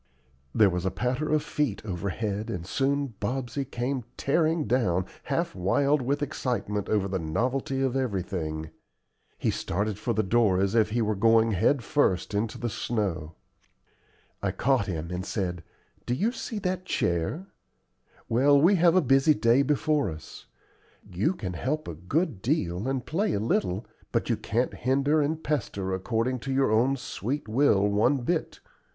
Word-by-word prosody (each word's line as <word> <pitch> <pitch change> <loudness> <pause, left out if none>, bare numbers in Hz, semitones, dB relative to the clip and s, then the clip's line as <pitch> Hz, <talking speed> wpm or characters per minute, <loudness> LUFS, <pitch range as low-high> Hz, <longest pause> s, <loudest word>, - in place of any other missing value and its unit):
There 105 -3 +5
was 90 0 -2
a 95 - +1
patter 125 +8 -2
of 155 -1 +2
feet 130 -10 -2
overhead, 100 +2 -3
and 85 -2 -4
soon 140 +4 0
Bobsey 125 +4 -2
came 125 0 -3
tearing 160 +2 +1
down, 100 -7 +1 0.2
half - - -1
wild 140 +11 +2
with 140 +4 0
excitement 110 -7 -2
over 105 -3 +1
the 95 -1 -2
novelty 125 +11 -1
of 130 -1 0
everything. 90 -10 -2 0.7
He - - 0
started 100 +2 -2
for 120 - -1
the 110 0 +1
door 105 -2 +3
as 100 +1 +1
if 110 -2 +3
he 115 +2 0
were 110 0 +1
going 115 +2 +4
head 120 +7 +2
first 110 -11 +1
into 105 +2 -1
the 120 - -3
snow. 95 -9 -2 1.1
I - - 0
caught 130 -5 +1
him, 85 -2 -4
and 90 +1 -3
said: 90 -4 -3 0.4
"Do 120 - +1
you 210 - +1
see 240 -3 -5
that 185 -2 -2
chair? 90 - -1 0.8
Well, 140 +5 +4
we 170 +7 +5
all - - -1
have 175 0 +5
a 185 - +6
busy 135 +2 +4
day 120 +2 +4
before 145 -2 +1
us. 80 -1 -10 0.6
You 100 - 0
can 95 - -5
help 145 - -2
a 85 - -4
good 110 - -1
deal, 100 - -1
and 135 -2 -2
play 190 +8 0
a - - 0
little, 100 -2 0 0.3
but - - 0
you - - +3
can't 120 +4 -1
hinder 140 +4 +2
and 155 +2 -1
pester 100 -10 -2
according 115 +6 -1
to 135 - -5
your 135 -3 +2
own 125 +5 +3
sweet 125 +3 -4
will 110 -4 +3
one 110 +7 +2
bit. 160 +7 -2
115 Hz, 165 wpm, -27 LUFS, 95-140 Hz, 1.1 s, a